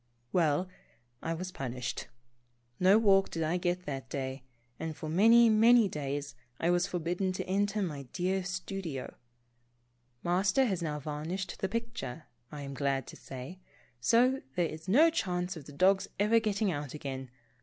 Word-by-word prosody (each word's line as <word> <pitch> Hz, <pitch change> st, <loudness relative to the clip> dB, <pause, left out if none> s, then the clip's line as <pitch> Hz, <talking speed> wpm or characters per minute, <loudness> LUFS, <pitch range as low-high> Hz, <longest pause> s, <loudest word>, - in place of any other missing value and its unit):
Well, 165 Hz, 0 st, +2 dB, 0.5 s
I 165 Hz, 0 st, -2 dB
was 185 Hz, +2 st, -5 dB
pun 130 Hz, -6 st, -5 dB
ished. 125 Hz, -2 st, -4 dB, 0.7 s
No 190 Hz, +3 st, +6 dB
walk 195 Hz, -3 st, +4 dB
did 165 Hz, -, -2 dB
I 160 Hz, +3 st, +1 dB
get 180 Hz, 0 st, -1 dB
that 135 Hz, -2 st, -5 dB
day, 130 Hz, -1 st, -4 dB, 0.4 s
and 160 Hz, -1 st, -4 dB
for 155 Hz, -, -6 dB
many, 225 Hz, +8 st, +6 dB
many 225 Hz, +1 st, +6 dB
days 145 Hz, -3 st, -4 dB, 0.3 s
I 170 Hz, -, +2 dB
was 175 Hz, +1 st, +2 dB
forbidden 180 Hz, +2 st, -1 dB
to -, -, -4 dB
enter 200 Hz, +2 st, 0 dB
my 145 Hz, -7 st, -5 dB
dear 185 Hz, +1 st, 0 dB
stu 190 Hz, +1 st, -4 dB
dio. 145 Hz, -8 st, -5 dB, 1.1 s
Master 190 Hz, +9 st, +3 dB
has 190 Hz, -7 st, -1 dB
now 150 Hz, -3 st, -2 dB
varnished 155 Hz, +6 st, -4 dB
the 190 Hz, -, -1 dB
picture, 200 Hz, -, -4 dB, 0.3 s
I 150 Hz, -2 st, -6 dB
am 140 Hz, 0 st, -6 dB
glad 135 Hz, -1 st, 0 dB
to -, -, -9 dB
say, 135 Hz, +8 st, -9 dB, 0.4 s
so 245 Hz, -, +3 dB
there 175 Hz, -, +2 dB
is 160 Hz, +1 st, -7 dB
no 300 Hz, -, +6 dB
chance 180 Hz, -, -1 dB
of 155 Hz, -4 st, -9 dB
the -, -, -9 dB
dog's 190 Hz, +6 st, +3 dB
ever 215 Hz, +3 st, +4 dB
getting 210 Hz, -2 st, 0 dB
out 145 Hz, -3 st, -4 dB
again. 135 Hz, -3 st, -5 dB
180 Hz, 165 wpm, -31 LUFS, 145-195 Hz, 1.1 s, No